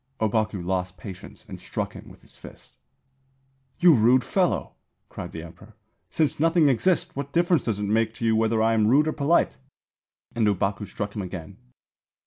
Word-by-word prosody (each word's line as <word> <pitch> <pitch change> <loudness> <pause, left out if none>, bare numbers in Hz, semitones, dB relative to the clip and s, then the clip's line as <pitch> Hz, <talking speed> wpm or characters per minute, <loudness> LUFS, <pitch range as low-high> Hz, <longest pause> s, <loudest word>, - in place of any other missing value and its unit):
Ōbaku 110 -4 -1
lost 90 0 -2
patience 95 0 -11
and - - -9
struck - - -4
him - - -11
with - - -17
his - - -17
fist. - - -14 1.0
'You 175 -2 +7
rude 125 +1 +4
fellow,' 185 -3 0 0.4
cried 90 - -8
the 80 - -7
Emperor. 85 - -14 0.3
'Since 155 -3 0
nothing 165 -1 +4
exists, 165 +8 +1
what 140 0 -5
difference 170 +1 +2
does 110 -4 -1
it 105 - -4
make 110 +2 0
to 115 - -4
you 110 -1 +3
whether 110 0 +2
I 115 0 +3
am 110 -1 +2
rude 145 +6 +4
or 155 - 0
polite?' 145 - +1 0.8
and 115 -2 +1
Ōbaku 100 +1 -1
struck 100 +1 -5
him 105 - -3
again. 90 -4 -8
110 Hz, 175 wpm, -25 LUFS, 100-145 Hz, 1.0 s, You